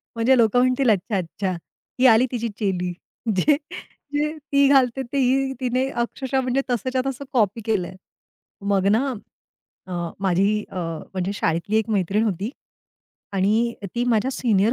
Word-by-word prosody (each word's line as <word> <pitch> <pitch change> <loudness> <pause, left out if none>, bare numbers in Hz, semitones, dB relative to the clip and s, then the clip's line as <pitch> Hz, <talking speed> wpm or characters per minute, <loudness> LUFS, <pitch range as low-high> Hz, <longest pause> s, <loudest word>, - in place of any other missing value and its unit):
म्हणजे 245 +3 +4
लोक 225 -1 +3
म्हणतील, 255 +1 +3
"अच्छा 205 0 +1
अच्छा. 185 +2 -3 0.5
ही 260 - +4
आली 230 +1 +6
तिची 235 -1 -2
चेली, 180 -3 -1 0.4
जे, 285 +11 +4 0.6
जे 300 +2 0
ती 280 -1 +2
घालते 270 -2 +4
ते - - 0
ही 265 +1 +2
तिने 255 +1 0
अक्षरशः 265 +2 -2
म्हणजे 255 +1 0
तसंच्या 255 +2 0
तसं 270 +1 -4
कॉपी 225 -2 +2
केलंय." 190 -5 -1 0.8
मग 195 -1 +2
ना 225 +6 +3 0.8
अ, - - -6 0.3
माझी 195 +3 +2
अ, - - -10 0.4
म्हणजे 190 +1 -2
शाळेतली 170 +5 0
एक 220 0 +1
मैत्रीण 205 +2 +1
होती 200 +1 -2 0.8
आणि 215 +5 +2
अ, 200 - -4
ती 240 0 0
माझ्या 245 +1 +2
सीनियर 225 -4 +2
230 Hz, 150 wpm, -23 LUFS, 200-260 Hz, 0.8 s, आली